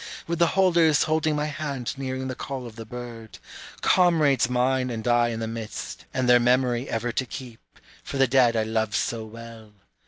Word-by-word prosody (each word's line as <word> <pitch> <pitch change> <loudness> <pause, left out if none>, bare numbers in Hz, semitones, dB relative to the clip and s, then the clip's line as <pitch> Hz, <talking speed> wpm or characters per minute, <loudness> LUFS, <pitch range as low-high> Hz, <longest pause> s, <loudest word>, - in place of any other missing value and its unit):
With 170 0 -3
the 170 - +5
holders 170 -5 +4
holding 155 0 +1
my 150 0 -1
hand 140 -5 -4
nearing 130 -1 -4
the 130 - -3
call 130 0 -6
of 115 -2 -10
the 115 -1 -9
bird, 115 -2 -9 0.4
Comrades 155 -9 +3
mine 125 +1 +1
and 115 -1 -4
I 120 0 +4
in 115 -1 -3
the 115 - -3
midst, 110 -2 -6
and 130 -1 -1
their 125 0 +7
memory 125 0 +1
ever 115 +1 -2
to 130 - -1
keep, 120 -4 -8 0.4
for - - -5
the 135 - +5
dead 125 -2 +4
I 110 - +2
loved 110 -1 -1
so 115 -2 -1
well. 115 -1 -11
125 Hz, 190 wpm, -25 LUFS, 115-135 Hz, 0.4 s, their